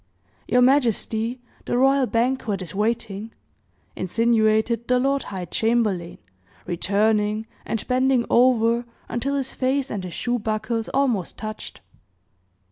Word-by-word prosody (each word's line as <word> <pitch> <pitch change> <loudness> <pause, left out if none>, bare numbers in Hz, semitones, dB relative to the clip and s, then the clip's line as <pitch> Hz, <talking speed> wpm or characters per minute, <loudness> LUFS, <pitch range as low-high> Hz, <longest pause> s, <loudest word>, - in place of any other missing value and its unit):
"Your 250 0 +4
majesty, 245 -2 +1 0.2
the 240 - 0
royal 270 0 +4
banquet 230 -5 0
is 170 -1 -8
waiting," 215 0 -2 0.6
insinuated 225 +3 +1
the 250 - +3
lord 275 +2 +1
high 185 -3 -5
chamberlain, 210 -3 0 0.5
returning, 210 +4 +1 0.2
and 225 - -3
bending 255 -1 +2
over 235 -1 +3 0.2
until 275 +4 -1
his 270 -2 -2
face 265 +1 0
and 200 -3 -3
his 180 -2 -6
shoe 245 0 -1
buckles 220 +1 -2
almost 250 -10 0
touched. 215 0 -7
230 Hz, 120 wpm, -23 LUFS, 215-250 Hz, 0.6 s, Your